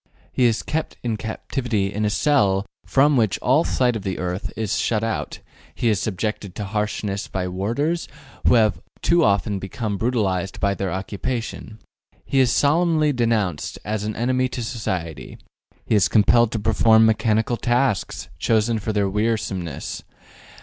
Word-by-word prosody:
He 125 - +2
is 115 -2 +2
kept 160 +1 -3
in 115 -2 -1
captivity 110 -2 -2
in 105 +1 -1
a - - +2
cell 100 -6 +2 0.2
from 140 +1 +4
which 110 -5 +2
all 135 +6 +3
sight 125 -6 +1
of 110 - -3
the 95 -3 -3
earth 90 +2 -3
is 110 -2 -1
shut 110 -2 0
out: 115 -1 -3 0.3
he 120 - +1
is 105 -4 +2
subjected 105 -1 -3
to 105 - -4
harshness 105 -1 -2
by 95 -1 -3
warders, 120 - -1 0.4
who - - +6
have 105 -7 +3 0.2
too 170 0 +4
often 100 -1 +1
become 100 +2 -4
brutalized 95 -5 -1
by 100 0 +1
their 95 -1 -3
occupation. 110 +3 -4 0.5
He 135 - +1
is 130 -3 +4
solemnly 155 0 +3
denounced 110 - 0
as 105 0 -2
an 110 0 -3
enemy 130 +2 +1
to 125 -1 -4
society. 95 - -4 0.5
He - - -1
is 100 -6 +4
compelled 110 +5 +4
to 110 - -1
perform 110 +1 +4
mechanical 110 +1 +2
tasks, 120 -5 0
chosen 110 0 +2
for 110 +1 -2
their 105 -2 +1
wearisomeness. 95 -6 -2
110 Hz, 155 wpm, -22 LUFS, 100-120 Hz, 0.5 s, who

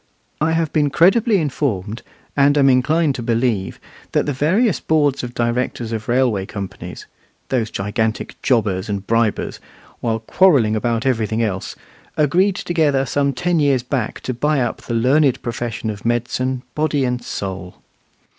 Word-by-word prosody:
I 160 +1 +2
have 165 -2 0
been 150 -2 +2
credibly 205 - +4
informed, 120 - -2 0.3
and 145 +1 +4
am 135 -1 +5
inclined 150 +4 +2
to 125 - -5
believe, 115 -5 -1 0.3
that - - +2
the 145 - -1
various 185 - +2
boards 145 -3 +1
of 120 0 -6
directors 120 -1 -1
of 110 -2 -4
railway 120 -6 +1
companies, 100 -2 -7 0.4
those 120 -4 0
gigantic 105 +2 -2
jobbers 105 -6 +1
and 100 -1 -3
bribers, 115 -1 0 0.4
while 115 -1 0
quarrelling 115 - +3
about 115 +2 -1
everything 115 -3 0
else, 95 -4 -3 0.4
agreed 180 +7 +3
together 150 -7 +1
some 140 +3 +1
ten 170 +6 0
years 140 -4 +2
back 125 -3 -3
to 130 - -3
buy 150 +4 +1
up 120 -3 -2
the 120 - -4
learned 130 +3 +3
profession 120 -1 -3
of 105 0 -9
medicine, 125 +2 -1
body 150 -3 0
and 125 -1 -2
soul. 95 -2 -5
125 Hz, 150 wpm, -20 LUFS, 115-145 Hz, 0.4 s, am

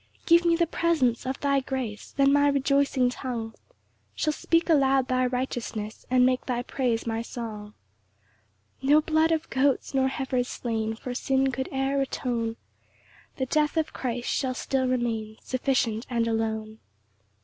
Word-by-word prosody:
2 335 - +6
Give 340 +1 +3
me 335 - +4
the 340 0 +2
presence 290 -8 +1
of 260 - -3
thy 280 -1 +2
grace, 260 -6 -5
Then 275 0 +4
my 285 0 +4
rejoicing 275 -2 +2
tongue 235 -4 -5 0.6
Shall 305 - 0
speak 330 +2 +1
aloud 270 -5 +3
thy 255 0 +2
righteousness, 245 -4 -4
And 250 0 +5
make 255 0 +1
thy 245 -1 -1
praise 245 -3 -1
my 225 -1 -1
song. 215 -3 -7 1.0
3 270 - -3
No 300 +1 +7
blood 315 +1 +2
of 320 -1 0
goats, 270 +1 +1
nor 265 -1 +3
heifers 260 -2 -1
slain, 225 -2 -2
For 250 +2 -6
sin 265 +1 +1
could 265 +1 -3
e'er 270 +1 0
atone; 235 -4 -2 0.8
The 260 - -1
death 300 +3 +1
of 315 -1 0
Christ 245 -1 -3
shall 260 -2 -1
still 260 0 0
remain 225 -4 -1
Sufficient 255 -3 0
and 235 -2 0
alone. 220 -1 -2
255 Hz, 160 wpm, -26 LUFS, 235-275 Hz, 1.0 s, No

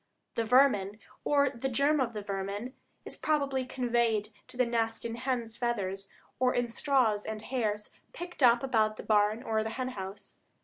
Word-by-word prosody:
The 230 - -1
vermin, 220 -5 +4 0.3
or 280 -2 +3
the 265 +1 -3
germ 280 +4 +2
of 240 -2 -1
the 210 -1 -5
vermin, 200 +5 -4 0.3
is - - -6
probably 280 -4 0
conveyed 235 -4 0 0.2
to - - -10
the 250 - +4
nest 225 -1 -1
in 230 - -3
hen's 235 -2 -3
feathers, 195 -5 -2 0.3
or 255 0 +3
in 245 -1 +1
straws 230 -5 +2
and 220 0 -4
hairs 215 -4 -2 0.2
picked 350 -2 -8
up 240 -1 +6
about 220 -5 +2
the - - -7
barn 215 +2 +2
or 220 -3 0
hen 250 +4 -3
house. 195 -3 -8
235 Hz, 170 wpm, -30 LUFS, 210-255 Hz, 0.3 s, up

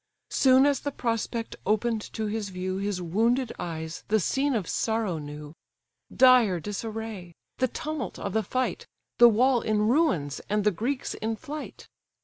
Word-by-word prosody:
Soon 260 0 +5
as 285 -2 +2
the 285 - -3
prospect 230 -2 -2
open'd 220 +2 +1
to 220 - -2
his 210 -1 -3
view, 185 0 -3
His 200 -1 -2
wounded 230 +8 +1
eyes 160 -1 -5
the 220 +1 +3
scene 270 +8 0
of 200 -7 -2
sorrow 220 -7 -1
knew; 150 0 -8 0.6
Dire 250 -8 +5
disarray! 210 -2 -6 0.2
the 255 - +3
tumult 305 -1 -5
of 200 - -4
the 220 - +2
fight, 255 +5 -2 0.3
The 240 0 +10
wall 245 +2 +3
in 215 -1 +1
ruins, 220 - +1
and 210 0 +1
the 210 - +3
Greeks 250 +8 -2
in 225 +1 -3
flight. 300 +4 -8
220 Hz, 155 wpm, -27 LUFS, 190-250 Hz, 0.6 s, The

